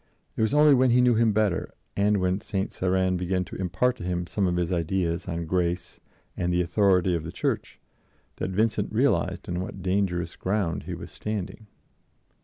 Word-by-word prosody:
It - - -2
was 110 0 +2
only 150 0 +6
when 130 -1 +4
he 120 +1 +4
knew 125 -1 +5
him 115 0 +3
better, 105 -3 0 0.2
and 105 +1 +3
when 90 +1 0
St. 95 -1 -3
Cyran 95 0 +1
had - - 0
begun 90 +1 -1
to 95 - -9
impart 95 +8 0
to - - -8
him 90 -1 -2
some 95 +2 0
of 90 - 0
his 90 0 -1
ideas 85 0 -1
on 85 -1 -3
grace 90 +1 -1 0.4
and 90 0 -1
the 90 - +1
authority 90 0 +3
of 85 -2 -1
the 85 - -6
Church, - - -3 0.6
that - - -2
Vincent 105 +4 0
realized - - +1
on 90 0 -2
what 95 0 -7
dangerous 90 -3 0
ground 95 -4 -1
he - - -4
was - - -9
standing. 105 0 -5
95 Hz, 195 wpm, -26 LUFS, 90-105 Hz, 0.6 s, only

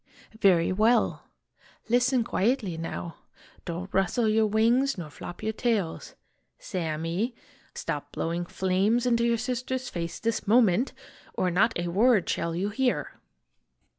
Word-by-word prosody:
" 220 - -21
Very 170 -2 +3
well. 220 +4 +2 0.6
Listen 245 +1 +3
quietly, 220 -4 0
now. 165 +1 -5 0.5
Don't 180 +3 -5
rustle 195 +5 +1
your 215 0 +3
wings 230 +5 +2
nor 160 -4 -7
flop 175 +6 -9
your 220 +1 -1
tails. 215 -8 -2 0.4
Sammy! 170 +6 -3 0.4
stop - - -4
blowing 170 +1 -3
flames 195 +7 +1
into 235 -1 +2
your 235 0 +2
sister's 255 +2 -3
face, 170 -1 -5
this 230 -1 -2
moment! 230 +1 +4 0.4
or 180 - +1
not 220 +6 +2
a 175 0 -2
word 210 +2 +3
shall 170 0 -1
you 190 +4 -1
hear. 250 +4 0
215 Hz, 135 wpm, -27 LUFS, 175-235 Hz, 0.6 s, moment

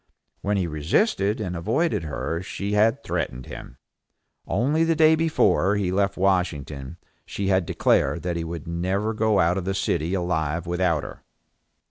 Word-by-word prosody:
When 100 0 0
he 95 - 0
resisted 100 - +1
and 90 -4 -3
avoided 110 - 0
her 80 +2 -3
she 100 +3 -4
had 110 +6 +2
threatened 65 0 -3
him. - - -10 0.7
Only 145 +10 +1
the 165 0 +2
day 155 0 +6
before 160 - +2
he 100 -3 0
left 100 +1 0
Washington 85 -6 -1 0.3
she 100 -1 -3
had 95 -3 +2
declared - - +1
that 90 -1 -2
he 85 - -2
should 85 +1 -6
never 95 +6 -1
go 110 -1 +2
out 85 +3 +2
of 90 - -6
the 95 0 -1
city 85 0 0
alive 85 -2 -1
without 85 -3 0
her. - - -9
95 Hz, 160 wpm, -24 LUFS, 85-105 Hz, 0.7 s, day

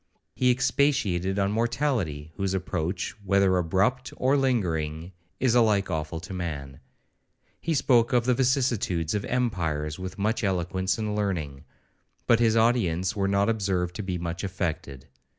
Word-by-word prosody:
He 125 - +2
expatiated 125 -8 +1
on 100 0 +1
mortality, 115 - -1
whose 95 -1 -1
approach, 90 -1 -2
whether 100 -1 +3
abrupt 95 +9 +1
or 130 +2 +2
lingering, 85 - -1 0.3
is 125 -3 +2
alike 105 -5 +3
awful 80 +1 -3
to 95 - -8
man.—He 80 - -7
spoke 120 -4 +3
of 120 -2 +2
the 125 - +3
vicissitudes 120 - +1
of 105 -1 -1
empires 80 - -1
with 95 0 -6
much 110 +3 0
eloquence 95 0 0
and 105 -2 -2
learning, 80 -9 -3 0.6
but 115 -1 +4
his 115 -2 +3
audience 95 -7 +2
were 100 -1 0
not 100 +1 +2
observed 95 -5 0
to - - -3
be 95 -3 -3
much 85 +2 -4
affected. 80 -7 -4
95 Hz, 140 wpm, -26 LUFS, 85-115 Hz, 0.6 s, but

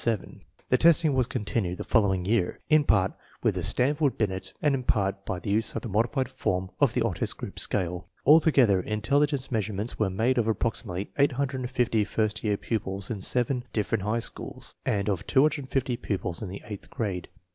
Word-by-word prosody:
The 125 - +3
testing 165 -2 +5
was 130 -3 +2
continued 105 -7 -2
the - - -4
following 95 -5 +2
year, 100 -3 +1
in 155 -2 +5
part 95 -6 +3 0.3
with - - +3
the - - -3
Stanford 145 +2 +1
Binet 95 -3 -2
and 145 -2 +2
in 135 - 0
part 100 -4 0
by 95 - -2
the 100 - -4
use 110 +2 0
of 115 - -3
a - - -2
modified 120 +6 0
form 95 +1 -2
of 135 -5 +3
the 125 - +2
Otis 105 -8 -1
Group - - -7
Scale. 90 -2 -1 0.2
Alto 160 +2 +7
gether, 115 -11 +4
intelligence 135 - 0
measurements 105 0 -2
were 110 -3 +2
made 115 +7 +1
of 115 - +1
ap 110 - +1
proximately 100 -4 -3
850 130 -4 +1
first 110 +1 -1
year 105 -2 +1
pupils 100 -3 -3
in 105 -4 -4
seven 125 +4 0
different 105 -1 0
high 105 +3 0
schools, 115 - -5
and 100 -1 0
of 100 -1 -1
250 135 -3 +1
pupils 95 -6 -2
in 105 - -4
the 100 - -8
eighth 105 -2 -8
grade. 95 -6 -3
110 Hz, 185 wpm, -27 LUFS, 100-130 Hz, 0.3 s, Alto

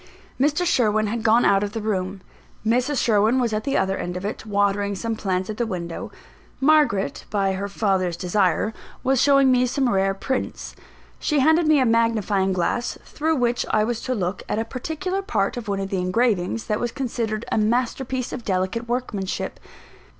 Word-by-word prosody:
Mr. 295 +6 +2
Sherwin 215 -9 +2
had 225 +2 -2
gone 230 +1 +4
out 195 0 +4
of 205 0 -3
the 225 - -2
room; 195 -3 -2 0.4
Mrs. 250 +5 +1
Sherwin 220 +3 +3
was 235 -3 0
at 215 0 -2
the 275 - +1
other 190 0 +1
end 180 +1 -4
of 185 - -6
it, 215 +1 -5
watering 200 0 +1
some 225 +3 -3
plants 190 -3 -1
at 215 - -5
the 235 - 0
window; 170 -4 -5 0.5
Margaret, 275 - +2
by 195 -2 +1
her 195 +1 -3
father's 190 -4 0
desire, 190 +3 +1 0.3
was 265 -1 +2
showing 275 -2 +5
me 250 0 +3
some 265 +1 0
rare 195 -3 +1
prints. 260 +6 -4 0.4
She 300 - 0
handed 320 +3 +4
me 305 -2 +5
a 260 - +3
magnifying 225 -4 +2
glass, 185 +6 -1
through 315 +1 -1
which 245 -3 +1
I 215 - +3
was 235 +1 -2
to 255 - -2
look 185 -2 -2
at - - 0
a 225 - -1
particular 320 +10 -3
part 210 - -1
of 240 -3 -6
one 200 -1 -1
of 195 0 -4
the 190 - 0
engravings, 210 +1 +1
that 210 -2 -1
was 240 -1 -2
considered 230 -5 -3
a - - +2
master 240 +4 +1
piece 255 -1 -4
of 250 - -5
delicate 190 +4 -1
workmanship. 215 -6 -3
220 Hz, 190 wpm, -23 LUFS, 195-250 Hz, 0.5 s, showing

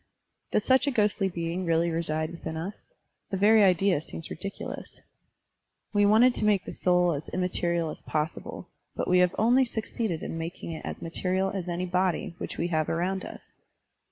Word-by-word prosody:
Does 210 - +2
such 260 +2 +3
a - - +3
ghostly 210 -4 +1
being 170 +1 -3
really 165 0 +2
reside 160 -1 -1
within 165 -1 -6
us? 190 - -7 0.4
The 195 - -2
very 210 +2 +6
idea 185 -3 +3
seems 160 - -8
ridiculous. 195 +4 -6 0.9
We 205 -1 +4
wanted 230 +4 +6
to - - -2
make 205 -3 +3
the - - -6
soul 180 -1 +2
as 145 +1 -5
immaterial 170 -2 0
as - - -9
possible, 155 +1 -3 0.3
but - - -2
we 180 0 +4
have 180 0 +3
only 245 +5 +5
succeeded 220 -6 -3
in 165 - -4
making 165 +1 -5
it 160 - -6
as - - -6
material 185 +3 0
as 185 -3 -4
any 175 +1 -2
body 180 -2 0
which - - -5
we 175 - -1
have 155 -2 0
around 185 +3 -1
us. - - -11
180 Hz, 180 wpm, -28 LUFS, 165-200 Hz, 0.9 s, very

